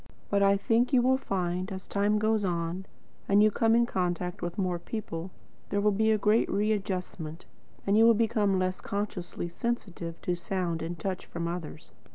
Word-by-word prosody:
But 200 Hz, 0 st, +3 dB
I 200 Hz, 0 st, +5 dB
think 235 Hz, +6 st, +2 dB
you 245 Hz, -2 st, +5 dB
will 260 Hz, +1 st, +3 dB
find, 185 Hz, -2 st, -2 dB
as 190 Hz, -1 st, -6 dB
time 205 Hz, +1 st, +1 dB
goes 215 Hz, 0 st, +2 dB
on, 175 Hz, +1 st, -2 dB, 0.4 s
and 200 Hz, +1 st, +6 dB
you 215 Hz, -, +5 dB
come 225 Hz, +2 st, +3 dB
in 235 Hz, 0 st, +4 dB
contact 180 Hz, -4 st, -2 dB
with 175 Hz, 0 st, -4 dB
more 180 Hz, -3 st, 0 dB
people, 180 Hz, -4 st, -5 dB, 0.4 s
there 200 Hz, -, 0 dB
will 210 Hz, +1 st, +3 dB
be 220 Hz, +2 st, +2 dB
a 220 Hz, -, +4 dB
great 210 Hz, +2 st, +3 dB
readjustment, 190 Hz, -6 st, -2 dB, 0.4 s
and 200 Hz, -, +3 dB
you 225 Hz, +1 st, +6 dB
will 230 Hz, 0 st, +7 dB
become 215 Hz, -3 st, +2 dB
less 185 Hz, 0 st, -1 dB
consciously 200 Hz, -4 st, -4 dB
sensitive 175 Hz, -5 st, -4 dB
to 180 Hz, -, 0 dB
sound 175 Hz, -1 st, -2 dB
and 170 Hz, +2 st, -4 dB
touch 185 Hz, +2 st, -4 dB
from 170 Hz, 0 st, -4 dB
others. 170 Hz, -2 st, -6 dB
195 Hz, 185 wpm, -29 LUFS, 175-215 Hz, 0.4 s, will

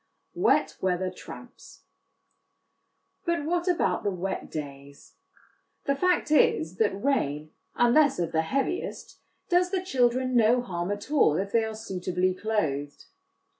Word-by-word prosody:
Wet -, -, +2 dB
Weather 185 Hz, 0 st, 0 dB
Tramps. 180 Hz, -, -12 dB, 1.4 s
But 340 Hz, -4 st, -1 dB
what 345 Hz, +2 st, -1 dB
about 260 Hz, -, +1 dB
the 205 Hz, -, +1 dB
wet 190 Hz, 0 st, -4 dB
days? 140 Hz, -, -9 dB, 0.7 s
The 280 Hz, -, +1 dB
fact 360 Hz, 0 st, +1 dB
is, 170 Hz, -, +3 dB
that 200 Hz, -2 st, 0 dB
rain, 155 Hz, -, 0 dB, 0.2 s
unless 270 Hz, +4 st, +4 dB
of 170 Hz, -2 st, -2 dB
the 160 Hz, -, +2 dB
heaviest, 275 Hz, -, -3 dB, 0.3 s
does 360 Hz, 0 st, +3 dB
the 370 Hz, -1 st, -1 dB
children 255 Hz, -4 st, +1 dB
no 235 Hz, +1 st, +4 dB
harm 175 Hz, -4 st, -4 dB
at 205 Hz, +6 st, -5 dB
all 275 Hz, -, +4 dB
if 195 Hz, +1 st, -3 dB
they 230 Hz, -1 st, +3 dB
are 220 Hz, 0 st, -4 dB
suitably 185 Hz, -3 st, -1 dB
clothed. 155 Hz, -9 st, -2 dB
205 Hz, 130 wpm, -27 LUFS, 175-275 Hz, 1.4 s, unless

